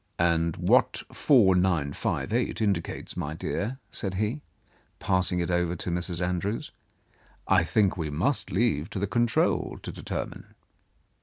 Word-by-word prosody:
"And 85 -1 +2
what - - +3
4958 95 - +2
indicates, 100 -6 -1
my 75 +2 -3
dear," 105 +8 -3
said 95 -2 -1
he, 110 +9 -1 0.6
pasing 90 -1 +1
it 85 - -2
over 85 0 +1
to 85 - -3
Mrs. 90 0 -1
Andrews, 95 +5 -2 0.8
"I - - +4
think 100 -4 +2
we 80 -3 -2
must 90 - 0
leave 90 -6 +1
to - - -6
the 100 - 0
control 120 +2 +1
to - - -5
determine." - - -6
90 Hz, 130 wpm, -27 LUFS, 85-105 Hz, 0.8 s, I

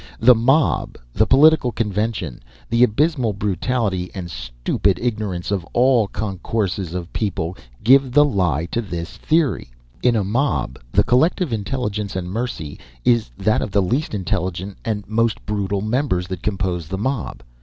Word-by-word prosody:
The 125 +2 +7
mob, 135 +6 +2 0.2
the - - +2
political 145 -2 +5
convention, 105 - -2 0.3
the 115 +1 +4
abysmal 125 0 +2
brutality 100 -1 -1
and 90 -3 -6
stupid - - -1
ignorance 105 -7 -2
of 100 -4 0
all 120 -3 +4
concourses 95 -3 -3
of 90 -1 -5
people, 90 -5 -2 0.3
give 135 +2 +5
the 145 +3 +6
lie 90 - 0
to 115 - 0
this 90 -4 -6
theory. 155 - +1 0.3
In 125 -1 +3
a 105 - +1
mob 110 - -1
the - - +4
collective 155 +3 +2
intelligence 105 -2 -3
and 90 -1 -3
mercy 100 -10 -4 0.3
is 120 -2 +3
that 105 +2 +1
of - - -2
the 100 0 +2
least 125 +7 -1
intelligent 95 +1 -3
and 105 -3 -3
most 115 +1 0
brutal 100 -1 -1
members 110 -5 0
that 95 -1 -5
compose 95 -5 -2
the 95 +3 -4
mob. 115 - -3
105 Hz, 150 wpm, -21 LUFS, 95-125 Hz, 0.3 s, The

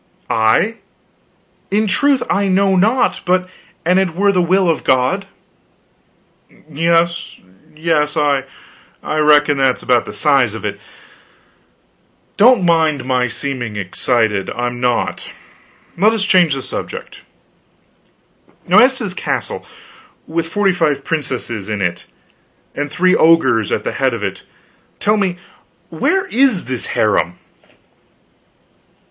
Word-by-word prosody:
"I? 115 - +2 0.9
In 210 +2 +1
truth 280 +4 +2
I 200 0 0
know 195 0 +2
not, 220 +7 +1
but 185 +1 +1 0.4
an 180 +2 +3
it 185 -4 -1
were 200 +2 +3
the 180 -2 +1
will 185 +2 +2
of 165 - 0
God." 130 +10 +1 1.4
"Yes, 165 +2 0 0.4
yes, 155 -1 0
I 145 -2 +2 0.6
reckon 150 -1 +3
that's 135 -2 +1
about - - +2
the - - -8
size - - +2
of - - -7
it. - - -4 1.6
Don't 230 -3 +5
mind 160 -5 +1
my 125 -1 +1
seeming 120 -3 -5
excited; 105 +1 -1
I'm 120 0 -3
not. 125 -1 -1 0.6
Let 210 +5 +3
us 215 -3 -1
change 175 -7 +3
the 135 - -5
subject. - - -7 1.5
Now - - +6
as - - +5
to - - -5
this - - -4
castle, - - -4 0.6
with 165 0 -3
forty 200 +2 +1
five 150 -5 0
princesses 130 -9 -4
in 105 -1 -3
it, 90 -3 -3 0.7
and 145 +1 -4
three 180 +5 +2
ogres 135 -10 +3
at - - -1
the - - -2
head 130 -3 0
of 110 - -6
it, 95 -1 -4 0.6
tell 210 +1 +1
me 190 -4 -1 0.5
where 385 0 0
is 250 -6 +1
this 130 -2 -2
harem?" 100 -4 +1
160 Hz, 125 wpm, -17 LUFS, 130-190 Hz, 1.6 s, Now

